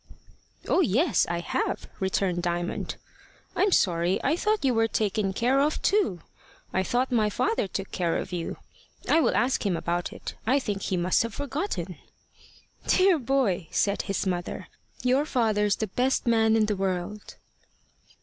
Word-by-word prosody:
"Oh - - +3
yes, 290 - +2
I 170 0 -1
have," - - -2
returned 190 -2 0
Diamond. 175 0 -2 0.6
"I'm 400 +1 +2
sorry! 175 - +2
I 285 +4 +2
thought 425 -2 0
you 260 - +3
were 225 0 +3
taken 210 -2 0
care 245 +7 +2
of 295 +2 +1
too. 375 - +2 0.5
I 190 - +2
thought 245 +7 0
my 220 -3 +2
father 400 - 0
took 195 +1 -5
care 170 -3 0
of - - -5
you. 175 -2 -4 0.5
I 325 - +4
will - - +2
ask 255 +2 +1
him 190 -5 0
about 175 +1 -2
it. - - -7
I 260 +4 +4
think 205 -7 -2
he 185 - -1
must 175 +1 +2
have 230 -2 -3
forgotten." 285 +7 -3 0.9
"Dear 370 -3 +4
boy!" 235 - 0
said 200 0 +1
his 195 0 -2
mother, 175 -2 -3 0.3
"your 255 +3 +3
father's 215 -8 +1
the 220 - -2
best 250 +8 0
man 225 -2 +3
in 220 -1 +3
the 210 -1 -1
world." 190 +2 -3
215 Hz, 160 wpm, -26 LUFS, 185-265 Hz, 0.9 s, I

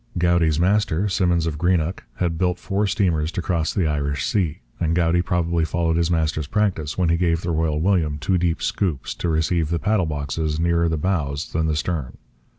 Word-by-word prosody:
Goudie's 85 -3 +2
master, 100 0 +2
Simmons 90 -3 +1
of 75 -2 -3
Greenock, 90 0 0
had 85 -3 -1
built 90 -1 +1
four 100 +1 -1
steamers 85 -6 +1
to - - -2
cross 85 -3 0
the 95 - 0
Irish 70 -3 -1
Sea; 85 -9 -1 0.2
and 85 -1 +1
Goudie 85 0 +2
probably 85 -1 0
followed 80 0 0
his 85 0 +1
master's 80 -3 0
practice 95 -7 -1
when 90 -3 +2
he 85 - +3
gave 85 -1 +1
the 85 - -2
Royal 80 -2 0
William 80 -4 +1
two 90 +4 0
deep 85 -1 0
'scoops' 85 -9 -1
to 85 - -3
receive 80 0 +1
the 85 - 0
paddle 95 -1 +1
boxes 75 +1 -2
nearer 85 0 +2
the 80 - -1
bows 75 -3 -2
than 80 0 +1
the 80 - 0
stern. 75 -5 -3
85 Hz, 195 wpm, -22 LUFS, 80-90 Hz, 0.2 s, he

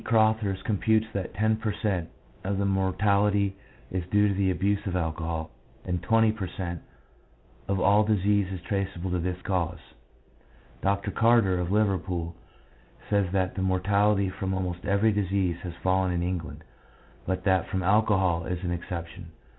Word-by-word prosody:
Crothers 110 -3 +2
computes 110 +1 +2
that 95 -2 -4
10 110 +1 +2
per 110 -1 -2
cent, 95 -6 -2 0.3
of 100 +1 -1
all 100 - +1
mortality 100 +1 +2 0.4
is 95 -1 -2
due 105 +1 +4
to - - +1
the 95 0 +1
abuse 100 +2 0
of 90 - -2
alcohol, 80 -1 -2 0.3
and 90 -2 -2
20 110 +4 +3
per 105 -4 -4
cent, 85 -2 -5 0.9
of 100 -1 0
all 100 +3 +5
disease 100 -2 +2
is 95 - -4
traceable 95 -2 -3
to 90 - 0
this 90 +1 -2
cause. 90 -4 -1 1.0
Dr. 100 0 0
Carter, 115 -6 +3
of 90 +1 -2
Liverpool, 95 -5 0 0.8
says 100 -3 +2
that 95 -1 +1
the 95 - -4
mortality 100 +1 +2
from 95 0 -3
almost 90 -2 -3
every 100 +3 +3
disease 95 -3 0
has 90 -2 -6
fallen 95 0 +2
in 85 -1 -1
England, 90 -2 -4 0.6
but 95 0 -1
that 95 -2 +2
from 95 0 -2
alcohol 95 -4 +2
is 90 0 -3
an 90 - -1
exception. 85 0 -6
95 Hz, 155 wpm, -27 LUFS, 90-100 Hz, 1.0 s, all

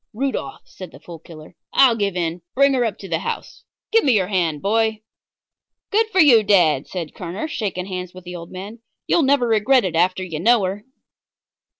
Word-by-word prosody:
"Rudolf," 270 +5 -4
said 185 -2 -11
the 135 - -14
Fool 165 +1 -11
Killer, 155 -1 -14 0.2
"I'll 255 -4 +5
give 200 -4 -2
in. 170 0 -2
Bring 275 +1 +4
her 250 -2 +1
up 225 -3 -2
to 195 - -10
the 165 -3 -1
house. - - -6 0.3
Give 455 0 +4
me 265 - +3
your 190 -3 +1
hand, 170 -6 0
boy." 220 +3 0 0.9
"Good 440 +2 +2
for 390 -4 -1
you, 265 -9 +7
dad," 175 -9 +3
said 170 -5 -6
Kerner, 180 - -5
shaking 200 - -4
hands 180 -2 -6
with 185 0 -13
the 180 0 -8
old 170 -1 -9
man. 200 +5 -8 0.3
"You'll 340 - +2
never 275 -3 +2
regret 230 +2 +3
it 180 - -3
after 185 +2 +1
you 165 -4 -5
know 230 +4 +3
her." 195 +3 -4
195 Hz, 200 wpm, -21 LUFS, 175-240 Hz, 0.9 s, you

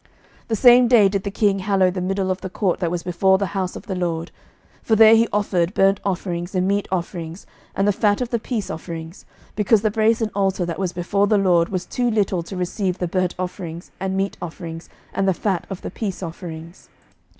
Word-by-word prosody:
11:008:064 - - -32 0.4
The 225 - 0
same 245 +2 +7
day 230 -5 +6
did 195 0 -1
the 200 - -2
king 200 -1 +1
hallow 190 -1 +2
the 185 0 -4
middle 190 +1 -1
of 185 - -3
the 190 - -5
court 185 -1 -1
that 175 -3 0
was 175 0 -3
before 190 +2 +3
the 200 - -1
house 190 -2 -2
of - - -9
the 200 - -4
LORD: 170 -2 -2 0.5
for 220 - +2
there 220 0 +8
he 230 +1 +4
offered 190 -3 0
burnt 195 +1 +3
offerings, 180 -1 -3
and 185 0 +1
meat 200 +1 0
offerings, 170 -1 -4 0.3
and 195 +1 +1
the - - +5
fat 205 0 +2
of 250 -2 -3
the 235 - 0
peace 220 -3 -3
offerings: 165 +1 -7 0.3
because 210 +1 +3
the 215 - +2
brasen 220 0 +1
altar 195 -2 0
that 170 0 -4
was 185 -3 -1
before 200 +3 0
the 210 - +3
LORD 175 -4 +3
was 185 -2 -3
too 245 -1 -1
little 200 -5 +1
to 180 +3 -8
receive 180 +1 -2
the 180 - -2
burnt 185 0 -1
offerings, 180 -2 -6
and 190 0 -2
meat 195 0 -1
offerings, 165 -1 -7 0.2
and 195 - 0
the 190 - +2
fat 190 -3 -2
of 195 -2 -7
the - - -5
peace 195 -2 -4
offerings. 165 0 -8
190 Hz, 220 wpm, -21 LUFS, 175-205 Hz, 0.5 s, there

